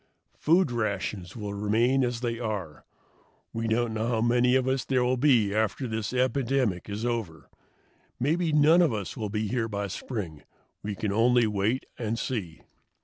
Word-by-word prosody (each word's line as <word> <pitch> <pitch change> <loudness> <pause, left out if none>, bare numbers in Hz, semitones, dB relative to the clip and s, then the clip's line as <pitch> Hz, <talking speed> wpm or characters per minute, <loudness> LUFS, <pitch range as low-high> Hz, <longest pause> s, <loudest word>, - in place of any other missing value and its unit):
Food 165 -2 +3
rations 100 -5 -3
will 105 -2 -5
remain 115 +6 +2
as 120 -1 -2
they 120 -2 -2
are. 100 -10 -4 0.7
We 115 0 -2
don't 115 +1 0
know 110 +1 -1
how 115 -2 0
many 120 +2 +3
of 130 -1 +2
us 130 -2 0
there 130 -2 +1
will 125 +1 +2
be 120 -7 +3
after 110 +4 0
this 110 -1 -3
epidemic 125 -6 0
is 105 +3 -3
over. 100 - -4 0.7
Maybe 160 +5 +1
none 155 +3 +5
of 165 -6 +3
us 105 -3 -4
will 110 -2 -4
be 105 +1 -2
here 115 +1 -1
by 100 -2 -3
spring; 90 - -5 0.4
we 105 0 -4
can 105 +1 -2
only 120 +2 +4
wait 105 +4 0
and 115 -1 -2
see." 100 -11 -4
115 Hz, 170 wpm, -27 LUFS, 105-125 Hz, 0.7 s, none